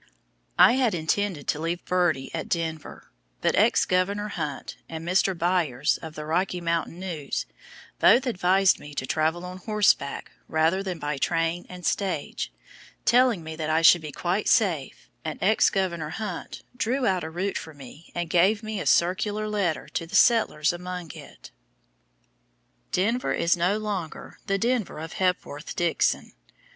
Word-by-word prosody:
I - - +8
had 245 -7 +2
intended 170 0 -1
to 150 - 0
leave 170 +2 -3
Birdie 175 -7 0
at 160 - -4
Denver, 160 -3 -4 0.3
but - - +1 0.3
Governor 200 +3 0
Hunt 150 -8 -5
and 165 0 -6
Mr. 185 0 +2
Byers 170 -5 +1
of 160 -1 -8
the 150 - -6
Rocky 180 +3 0
Mountain 170 0 -2
News 165 -7 -4 0.5
both 245 +3 +6
advised 190 -4 +3
me 145 -1 -11
to 130 - -2
travel 160 +5 0
on 180 0 -7
horseback 205 -7 +1 0.2
rather 160 +4 +2
than 185 -3 -4
by 145 -2 -3
train 165 +3 0
and 180 -2 -9
stage 175 - -2 0.5
telling 240 -6 +4
me 160 0 -6
that 155 -1 -3
I 160 +1 +2
should 170 +1 +7
be 155 -1 -7
quite 180 +7 -1
safe, 170 -11 +1 0.2
and 155 -1 -5 0.3
Governor 170 -5 -1
Hunt 185 0 -6
drew 250 +2 0
out 185 -4 +1
a 160 - -4
route 185 +5 -2
for 160 -2 -10
me 145 +4 -13
and 175 -1 -2
gave 190 +6 +3
me 215 -2 -4
a - - -3
circular 205 +5 +2
letter 200 -7 -1
to 165 - -4
the - - -6
settlers 215 -10 +4
along 180 -2 -6
it. - - -13 1.4
Denver 230 +7 +1
is 170 +2 +2
no 180 +4 +1
longer 205 -7 -5
the 195 - +1
Denver 235 -3 -1
of 160 +1 -7
Hepworth 180 -5 -2
Dixon. 175 -1 0
175 Hz, 155 wpm, -26 LUFS, 160-195 Hz, 1.4 s, I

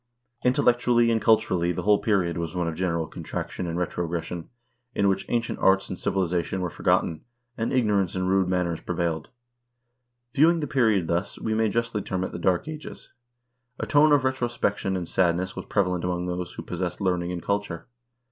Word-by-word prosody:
Intellectually 125 -2 +3
and 110 -1 +1
culturally 90 -6 +3
the 90 0 -3
whole 105 +1 +4
period 95 -6 +1
was 85 0 -4
one 90 -1 0
of 85 - -2
general 85 -1 -1
contraction 90 +3 -5
and 85 0 -3
retrogression, 85 -1 -3 0.5
in 100 - +2
which 95 0 0
ancient 115 -1 -1
arts 95 0 +3
and 95 - -5
civilization 90 0 0
were 90 -2 -2
forgotten, 80 -2 +1 0.3
and 115 - -2
ignorance 105 -8 +1
and 95 0 -1
rude 95 0 +3
manners 90 -3 -1
prevailed. 85 -2 -2 1.0
View 155 +3 +6
ing 170 0 +2
the 150 - -1
period 110 - +2
thus, 85 +4 -2
we 110 - -2
may 110 0 +2
justly 115 -1 -1
term 95 -1 -2
it - - -3
the - - -6
Dark 90 - +1
Ages. 155 -2 -9 0.7
A - - -2
tone 150 +1 +5
of 145 -3 +5
retrospection 120 -7 0
and 90 -2 -4
sadness 90 +1 +1
was - - -6
prevalent 90 -4 0
among 90 0 -1
those 90 0 -4
who - - -7
pos 90 0 -6
sessed 90 -1 -2
learning 90 -3 0
and 85 -2 -5
culture. 100 -5 -2
95 Hz, 185 wpm, -26 LUFS, 85-110 Hz, 1.0 s, View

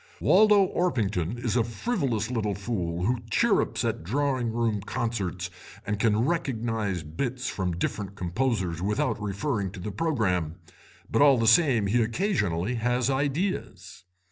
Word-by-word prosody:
Waldo 210 -2 +5
Orpington 110 - -1
is 120 -2 -2
a 120 - +3
frivolous 120 - -2
little 105 -4 -1
fool 90 -5 -3
who 125 +2 +1
chirrups - - +2
at - - -2
drawing 130 - 0
room 115 -3 0
concerts 100 -6 -3 0.3
and 105 0 -2
can 110 +1 +2
recognise 115 - -1
bits 125 - -3
from 90 -3 -2
different 100 +2 -3
composers 95 -3 -1
without 105 +2 0
referring 100 +1 -2
to - - -8
the 105 +4 -5
programme, 95 - 0 0.6
but - - +2
all 140 -2 +7
the 115 - +1
same 115 -2 +5
he 115 +5 +2
occasionally 115 - 0
has 125 +2 +1
ideas. 135 - -2
115 Hz, 140 wpm, -27 LUFS, 95-130 Hz, 0.6 s, all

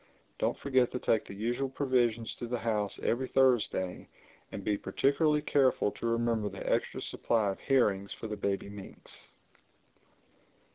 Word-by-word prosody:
Don't - - 0
forget 130 -3 +2
to - - 0
take 110 -3 +1
the 100 - -9
usual 120 +6 -1
provisions 120 -4 +1
to 120 - -4
the 125 +1 -1
house 105 -3 -1
every 130 +3 +1
Thursday, 120 -9 +1 0.4
and 100 - -6
be 105 - +1
particularly 150 +7 +1
careful 130 -8 +3
to 115 - -4
remember 115 -2 +1
the - - -7
extra - - 0
supply 110 -4 +1
of 95 - -8
herrings 100 -8 +2
for - - -7
the 105 - -3
baby 100 -1 -2
minks." 100 -1 -9
115 Hz, 150 wpm, -31 LUFS, 105-130 Hz, 0.4 s, careful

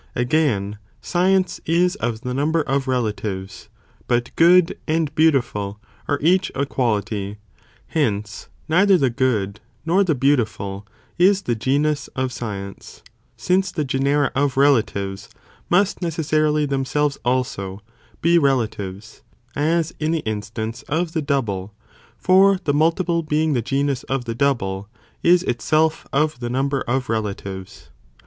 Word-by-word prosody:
Again, 120 -6 0 0.2
science'is 180 -1 +1
of 115 - -3
the 125 0 -4
number 155 +4 +1
of 135 -1 -1
relatives, 105 -5 -3 0.4
but 120 -1 0
good, 175 +1 +5
and 155 -2 0
beautiful, 120 -10 +1 0.3
are 145 - +1
each 180 +3 +3
a 140 - 0
quality, 105 -6 -2 0.5
hence 105 -9 -2 0.2
neither 190 +4 +4
the 135 -6 +1
good, 105 -6 0 0.3
nor 180 +5 +3
the 165 -6 +1
beautiful, 110 -7 0 0.3
is 195 +2 +4
the 120 - 0
genus 140 +6 0
of 130 -1 -1
science, 100 -5 -7 0.3
since 190 +1 +1
the 155 -5 -2
genera 140 +2 +1
of 135 -1 0
relatives, 105 -8 +1 0.4
must 195 +3 +2
necessarily 155 -2 +1
themselves 140 +1 -1
also, 105 -6 -2 0.4
be 170 +1 +5
relatives, 110 - -2 0.3
as 165 +2 +1
in 155 0 -1
the 165 -1 -1
instance 110 +2 -4
of 165 +3 -1
the 160 - 0
double, 105 -9 -2 0.4
for 190 +1 +5
the 145 - +1
multiple 170 +3 +2
being 155 0 0
the 120 - +1
genus 135 +2 -1
of 130 -1 -2
the 115 - -3
double, 105 -7 -1 0.3
is 175 +1 +4
itself 155 +5 0
of 150 -1 +1
the 120 -1 -4
number 135 +2 0
of 130 +1 0
relatives. 100 - -5
135 Hz, 130 wpm, -21 LUFS, 110-160 Hz, 0.5 s, good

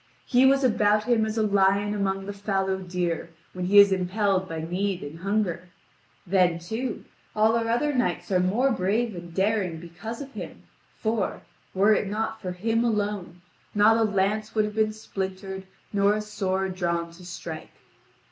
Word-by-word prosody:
He 260 +1 +5
was 275 +1 +4
about 210 -3 +3
him 225 -1 +2
as 215 +1 -4
a 220 - +2
lion 200 0 +3
among 195 -1 -1
the 205 - -5
fallow 195 -1 -1
deer, 175 -2 -2 0.2
when 180 -1 -3
he 200 +3 +4
is 200 -1 +9
impelled 190 0 +1
by 165 -1 -4
need 185 +3 -2
and 150 +3 -8
hunger. 185 -3 -1 0.6
Then, 180 -2 +3
too, 220 +8 -4 0.3
all 220 +1 +4
our 230 0 0
other 290 +6 +1
knights 235 -8 -1
are 185 - +4
more 220 +9 +2
brave 220 +3 0
and 175 -1 -8
daring 190 -2 0
because 175 +8 -8
of 275 -1 -8
him, - - -8 0.3
for, 220 -3 -1 0.3
were 200 +3 +5
it 210 - 0
not 220 +2 -3
for 185 -3 -4
him 225 +5 0
alone, 205 -6 -2 0.3
not 210 +2 +6
a 230 - +2
lance 210 +1 0
would 215 -1 +3
have 210 - -5
been 215 0 +2
splintered 190 -2 -5 0.3
nor 200 +1 +3
a 215 - -1
sword 190 -2 -2
drawn 170 -2 -1
to 170 +2 -14
strike. 165 -3 -7
200 Hz, 175 wpm, -26 LUFS, 185-220 Hz, 0.6 s, is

